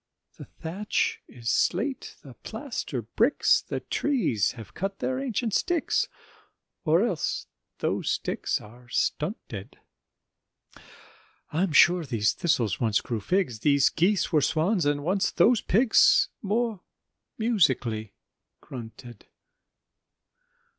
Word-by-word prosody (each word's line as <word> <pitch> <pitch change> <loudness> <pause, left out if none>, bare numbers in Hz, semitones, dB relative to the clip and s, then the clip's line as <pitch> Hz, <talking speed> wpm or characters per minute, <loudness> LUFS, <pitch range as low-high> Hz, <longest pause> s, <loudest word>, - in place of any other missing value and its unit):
The - - -8
thatch 185 +6 -2
is 115 -2 -4
slate, 240 +9 0
the 135 - -11
plaster 220 - -5
bricks, 230 - +2
The - - -5
trees 195 - 0
have 110 -4 -11
cut 195 +1 -4
their 260 0 -2
ancient 240 -4 -2
sticks, 345 - +1 0.8
Or 170 +5 +3
else 180 - -2 0.3
those - - -1
sticks - - -1
are 120 +3 -15
stunted: 150 - -3 1.7
I'm 175 +3 0
sure 175 +4 +5
these 115 -7 0
thistles 125 - 0
once 110 -3 +2
grew 115 -3 -4
figs, 180 - 0
These 140 +2 +4
geese 185 +4 +1
were 155 - +4
swans, 165 +3 +1
and 145 0 0
once 190 +4 +1
those 235 -2 +3
pigs 225 +4 +4
More 220 -1 -1 0.6
musically 130 - +1 0.4
grunted. 120 -2 -10
165 Hz, 110 wpm, -26 LUFS, -, 1.7 s, sure